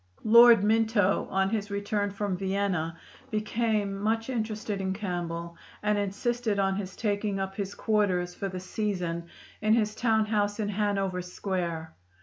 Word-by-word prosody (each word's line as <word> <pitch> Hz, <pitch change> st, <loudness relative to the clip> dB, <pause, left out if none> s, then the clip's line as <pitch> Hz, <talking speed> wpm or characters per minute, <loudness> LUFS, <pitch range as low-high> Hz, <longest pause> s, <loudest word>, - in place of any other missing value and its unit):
Lord 235 Hz, -1 st, +8 dB
Minto, 220 Hz, -2 st, +2 dB
on 195 Hz, +1 st, +1 dB
his 210 Hz, -2 st, -1 dB
return 205 Hz, 0 st, -1 dB
from 200 Hz, -1 st, -2 dB
Vienna, 190 Hz, -3 st, -1 dB, 0.3 s
became 215 Hz, -2 st, 0 dB
much 225 Hz, +4 st, 0 dB
interested 215 Hz, -3 st, -2 dB
in 190 Hz, 0 st, -1 dB
Campbell 170 Hz, -4 st, -4 dB, 0.3 s
and 210 Hz, 0 st, +2 dB
insisted 205 Hz, +2 st, -1 dB
on 195 Hz, -1 st, +2 dB
his 190 Hz, -2 st, -5 dB
taking 205 Hz, -2 st, -1 dB
up 195 Hz, 0 st, -3 dB
his 195 Hz, 0 st, -4 dB
quarters 190 Hz, -5 st, +1 dB
for 195 Hz, -, -4 dB
the 185 Hz, 0 st, -5 dB
season 180 Hz, -4 st, -3 dB, 0.3 s
in 215 Hz, +1 st, +4 dB
his 215 Hz, -2 st, +1 dB
town 220 Hz, -1 st, +2 dB
house 205 Hz, -1 st, 0 dB
in 205 Hz, -1 st, -1 dB
Hanover 195 Hz, -3 st, 0 dB
Square. 175 Hz, -3 st, -3 dB
205 Hz, 145 wpm, -28 LUFS, 190-215 Hz, 0.3 s, Lord